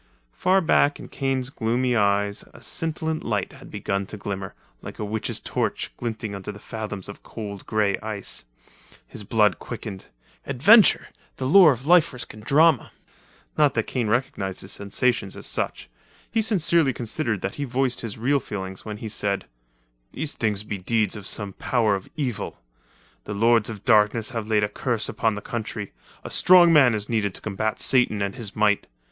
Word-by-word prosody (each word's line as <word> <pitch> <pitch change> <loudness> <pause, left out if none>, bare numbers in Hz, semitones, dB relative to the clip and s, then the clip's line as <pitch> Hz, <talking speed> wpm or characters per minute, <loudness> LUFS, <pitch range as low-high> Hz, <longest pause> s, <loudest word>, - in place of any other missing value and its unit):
Far 190 +1 +3
back 145 -3 +3
in - - -10
Kane's 135 -1 -2
gloomy 125 +1 0
eyes 100 -1 +1
a - - -13
scintillant 160 -1 -2
light 105 -4 -2
had - - -13
begun 100 0 -3
to 105 - -7
glimmer, 95 -1 -5 0.3
like - - -9
a 105 - -3
witch's 105 0 -2
torch - - -2
glinting 110 -3 -4
under 100 +1 -5
fathoms 105 -2 -6
of 100 - -10
cold 100 -3 -8
grey 105 -2 +1
ice. 105 -2 -3 0.6
His 105 - -7
blood 105 0 +2
quickened. 105 -5 -7 0.4
Adventure! 185 - +5 0.3
The 130 - -4
lure 170 +3 +8
of 130 0 -4
life 170 -3 +5
risk 125 - -8
and 105 0 -12
drama! 150 +1 +4 0.7
Not 145 -3 +4
that - - +2
Kane 120 -4 -2
recognized 105 -5 -1
his 95 - -7
sensations 100 +1 -1
as - - -8
such. - - -3 0.4
He 225 - +2
sincerely 170 - +2
considered 115 - -2
that 100 - -3
he - - +1
voiced 130 -1 0
his 115 -3 -5
real 135 +5 +2
feelings 95 -5 -6
when 105 -1 -6
he 110 - -6
said: 100 -2 -2 0.7
"These 155 -2 -3
things 105 -4 -1
be 105 -2 -5
deeds 110 +2 0
of 100 -2 -7
some 100 -2 -3
power 115 -2 +1
of 95 - -7
evil. 130 -8 -3 0.7
The 105 - -5
lords 115 +1 +3
of 105 -3 -8
darkness 110 +1 +3
have 115 -3 -4
laid 105 -1 +2
a - - +2
curse 115 +2 -1
upon 110 -2 0
the 105 - -6
country. 110 -3 -5 0.3
A - - -7
strong 175 -2 +6
man 135 -7 +6
is 105 -1 -4
needed 105 -4 -1
to - - -6
combat 110 +1 -2
Satan 125 -6 +3
and 100 - -2
his 115 -6 -6
might. 105 -1 +2
110 Hz, 175 wpm, -24 LUFS, 105-130 Hz, 0.7 s, lure